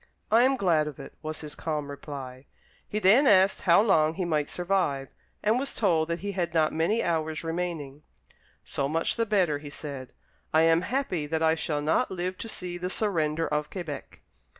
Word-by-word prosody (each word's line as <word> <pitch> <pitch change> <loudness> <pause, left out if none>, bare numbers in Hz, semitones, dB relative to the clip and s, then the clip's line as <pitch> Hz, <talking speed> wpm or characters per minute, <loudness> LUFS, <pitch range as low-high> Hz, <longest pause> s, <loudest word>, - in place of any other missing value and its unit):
"I 225 +2 +6
am 265 +2 +3
glad 165 -8 +2
of 150 - -7
it," - - -9
was 155 0 -5
his 150 -1 -6
calm 150 -3 -3
reply. 135 -2 -8 0.4
He 210 - -2
then 215 +8 +5
asked 195 -2 +5
how 175 +3 +5
long 160 -7 +3
he 185 - -2
might 155 -3 0
survive, 175 -7 -1 0.3
and 220 +4 +3
was 275 - -3
told 165 -7 +2
that 170 +1 -3
he 200 +1 -3
had 175 -3 -2
not 155 -1 +3
many 165 +8 +1
hours 160 -2 -1
remaining. 165 -4 -4 0.6
"So 140 0 -2
much 165 +2 0
the 230 -1 0
better," 180 -8 +2
he 145 0 -9
said; 140 -3 -7 0.4
"I 160 - +6
am 165 +1 +4
happy 185 - -2
that 160 +1 -1
I 160 0 +4
shall 150 -2 -2
not 160 +11 +2
live 185 0 -3
to 225 - -5
see 180 -4 -5
the 180 +1 -3
surrender 165 -6 0
of 150 0 -1
Quebec." 165 -7 -7
165 Hz, 195 wpm, -27 LUFS, 150-190 Hz, 0.6 s, I